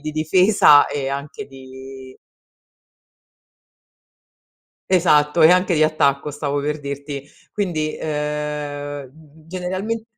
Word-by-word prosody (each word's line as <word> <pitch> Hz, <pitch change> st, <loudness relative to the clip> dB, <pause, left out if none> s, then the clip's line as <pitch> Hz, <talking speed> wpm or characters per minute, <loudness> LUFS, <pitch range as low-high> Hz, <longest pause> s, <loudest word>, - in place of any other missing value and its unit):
di 155 Hz, +1 st, -5 dB
difesa 155 Hz, 0 st, +4 dB
e 135 Hz, -2 st, -4 dB
anche 140 Hz, +1 st, -6 dB
di 130 Hz, 0 st, -12 dB, 2.7 s
Esatto, 165 Hz, -3 st, +3 dB
e 160 Hz, -, +8 dB
anche 180 Hz, -1 st, +3 dB
di 155 Hz, -, +3 dB
attacco 150 Hz, -2 st, +1 dB
stavo 145 Hz, 0 st, -3 dB
per 150 Hz, +2 st, -3 dB
dirti, 140 Hz, 0 st, -6 dB, 0.3 s
quindi, 160 Hz, -7 st, -2 dB
ehm, 150 Hz, -2 st, -4 dB, 0.4 s
generalment 185 Hz, +5 st, -4 dB
150 Hz, 95 wpm, -20 LUFS, 140-165 Hz, 2.7 s, e